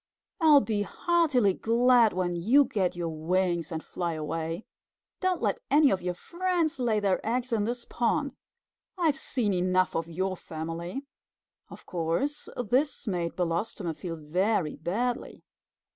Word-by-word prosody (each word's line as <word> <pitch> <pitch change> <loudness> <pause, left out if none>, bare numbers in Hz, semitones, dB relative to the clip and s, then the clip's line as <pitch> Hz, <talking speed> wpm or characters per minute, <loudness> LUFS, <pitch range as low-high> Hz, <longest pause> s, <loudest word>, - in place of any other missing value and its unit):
I'll 305 -3 +7
be 215 -4 -1
heartily 285 - +2
glad 235 +1 +4
when 175 -1 -1
you 240 +12 +4
get 190 -6 -1
your 170 -1 -2
wings 170 +1 0
and 160 -1 -4
fly 175 -2 -3
away. 160 +4 -4 0.5
Don't 370 -2 0
let - - +1
any 290 0 +5
of 185 - 0
your 180 0 -2
friends 345 - -1
lay 230 -4 +2
their 200 -2 0
eggs 240 +2 -1
in 210 -2 +1
this 240 +1 -3
pond. 275 +4 0 0.6
I've 325 -5 +2
seen 230 -6 -1
enough 185 0 +1
of 165 0 -1
your 185 +3 -2
family." 170 - -6 0.6
Of - - -12
course 175 - -2
this 255 +6 0
made 175 -6 -2
Belostoma 175 +1 -2
feel 165 +2 -6
very 170 +2 0
badly. 235 +9 -3
195 Hz, 145 wpm, -28 LUFS, 170-250 Hz, 0.6 s, I'll